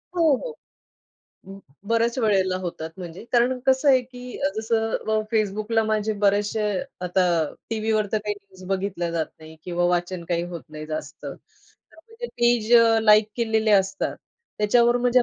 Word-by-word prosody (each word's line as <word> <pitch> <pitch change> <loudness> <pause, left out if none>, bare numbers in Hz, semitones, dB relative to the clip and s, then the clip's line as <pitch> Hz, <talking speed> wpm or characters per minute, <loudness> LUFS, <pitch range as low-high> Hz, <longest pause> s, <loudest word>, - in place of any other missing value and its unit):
हो, 320 -5 +4
हो. 480 - -6 0.9
अं, 195 +1 -10 0.3
बऱ्याच 230 +2 +1
वेळेला 195 -5 +2
होतात. 170 -3 -5
म्हणजे 175 +2 -8
कारण 250 +1 +3
कसं 265 +2 +3
आहे 260 -2 +6
की 250 0 -10
अ, - - +1
जसं 225 0 0
अ, 220 0 -1 0.2
Facebookला 215 +1 +1
माझे 215 0 0
बरेचशे 205 +2 +2 0.4
आता 180 +1 +2 0.5
टीव्हीवर 215 -1 0
तर 215 - +2
काही 210 0 -3
न्यूज 195 -2 -16
बघितल्या 190 -3 -2
जात 165 -2 -1
नाही 160 0 -13
किंवा 175 -1 -1
वाचन 175 0 -1
काही 170 -1 0
होत 170 - -6
नाही 155 0 -8
जास्त, 155 0 -5
तर - - -6 0.6
म्हणजे 450 +8 -9
पेज 240 - +1 0.3
लाइक 215 0 +5
केलेले 220 -2 +1
असतात, 195 -1 +1 0.4
त्याच्यावर 235 +3 +4
माझ्या 245 0 +3
215 Hz, 155 wpm, -24 LUFS, 185-235 Hz, 0.9 s, आहे